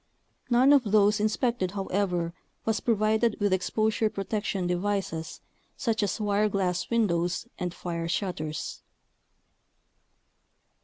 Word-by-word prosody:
None 255 +4 +6
of 280 -3 +5
those 210 0 +4
inspected, 215 -2 0
however, 185 -4 -1 0.3
was 220 -2 +1
provided 220 0 +2
with 205 -2 +2
exposure 215 +3 +1
protection 200 -2 -2
devices 180 -2 -2 0.4
such 230 -5 0
as 205 -1 -1
wire 210 0 +2
glass 180 -3 -1
windows 180 -5 +1
and 180 -1 -2
fire 170 -1 -4
shutters. 155 -5 -3
205 Hz, 105 wpm, -27 LUFS, 180-220 Hz, 0.4 s, None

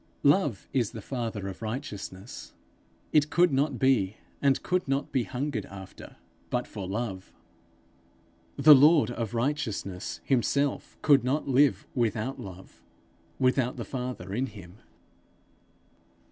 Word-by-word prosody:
Love 145 - +3
is 120 -7 0
the 110 - -6
father 115 -5 -4
of 95 +1 -7
righteousness. 110 -4 -6 0.6
It 150 -1 +4
could 175 0 +3
not 140 0 +1
be, 115 -7 +2 0.2
and 140 -2 +2
could 180 -2 0
not 135 +1 -1
be 130 -4 +1
hungered 125 -5 -3
after, 95 -1 -11 0.3
but 125 0 -1
for 100 -4 -7
love. 95 -2 -4 1.3
The 150 +2 +9
lord 145 0 +6
of 115 -1 -4
righteousness 115 -8 -2
himself 140 +2 0
could 140 -4 +5
not 140 +5 0
live 140 +1 +3
without 120 +2 -1
Love, 95 -1 -11 0.6
without 130 -1 +1
the - - -4
Father 125 -8 -5
in 130 +5 0
him. 100 -3 -12
125 Hz, 125 wpm, -28 LUFS, 105-140 Hz, 1.3 s, The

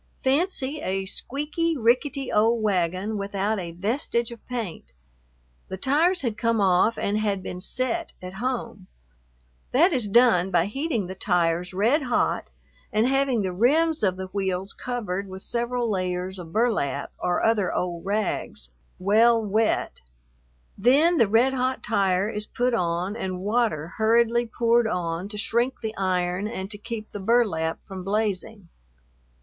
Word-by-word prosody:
Fancy 290 0 0
a 190 +1 -2
squeaky, 295 - -2
rickety 255 +3 +1
old 225 +2 +3
wagon 190 +1 0
without 200 +1 -1
a 170 -2 -5
vestige 235 - -1
of 235 - -11
paint. 220 - -5 0.7
The 190 - -5
tires 310 - +2
had 230 -3 -2
come 230 -1 +1
off 195 +3 +3
and 205 +1 0
had 200 -3 -1
been 180 0 -6
"set" 260 - -2
at 185 0 -8
home; 235 -6 -3 0.9
that 330 +8 +5
is 245 -6 0
done 200 -4 +4
by 175 -2 +2
heating 250 - -2
the 185 - -6
tires 180 -2 0
red 225 - +2
hot 245 -3 0 0.4
and 215 +2 +2
having 270 -4 +1
the 185 -1 -2
rims 305 - +2
of 190 -4 +2
the 190 - -4
wheels 190 -1 -1
covered 200 -6 -4
with 190 0 -7
several 240 0 -1
layers 185 -2 -2
of 165 -2 -9
burlap, 205 - 0
or 175 - 0
other 215 -5 +2
old 175 -2 -2
rags, 195 - -2 0.3
well 225 +5 +4
wet; 215 +1 0 0.8
then 290 - +4
the 230 - +5
red 235 +6 +3
hot 260 0 -1
tire 195 -3 +1
is 210 -1 -3
put 250 -1 0
on 180 0 -1
and 185 -5 -4
water 210 -7 0
hurriedly 235 +2 +3
poured 235 0 +2
on 175 -1 -2
to 210 - -7
shrink 235 +4 0
the 220 0 -3
iron 185 0 0
and 195 -3 -5
to 205 - -8
keep 220 -1 -6
the 205 - -6
burlap 190 -7 +1
from 190 -1 -7
blazing. 205 -1 -2
215 Hz, 150 wpm, -25 LUFS, 185-240 Hz, 0.9 s, that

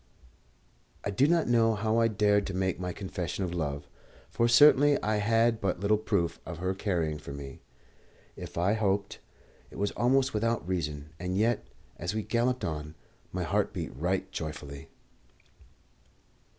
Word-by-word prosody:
I 100 - 0
do 130 +8 +3
not 170 0 +2
know 115 -2 +3
how 110 +2 +1
I 115 - +4
dared 105 -2 +2
to 95 - -4
make 95 -2 0
my 90 0 -3
confession 95 0 -4
of 90 -2 -3
love, 70 -4 -3 0.4
for 115 - +2
certainly 145 +3 +6
I 105 0 +1
had 115 +2 +2
but 95 -3 -1
little 105 +2 +2
proof 90 -6 -1
of 90 - -7
her 95 +2 -1
caring 85 -6 -1
for 70 - -9
me. 70 -1 -8 0.7
If - - -9
I 90 +4 +2
hoped, 100 -2 -1 0.5
it - - -12
was 100 +1 0
almost 130 +3 +2
without 115 -3 0
reason; 75 -5 -3
and 90 +1 -2
yet, 115 +3 +1 0.3
as 85 +5 -3
we 110 - -1
galloped 125 +3 0
on, 75 -1 -5 0.4
my - - -2
heart - - 0
beat - - -5
right 95 +5 -1
joyfully. 75 -5 -6
100 Hz, 160 wpm, -29 LUFS, 85-115 Hz, 0.7 s, certainly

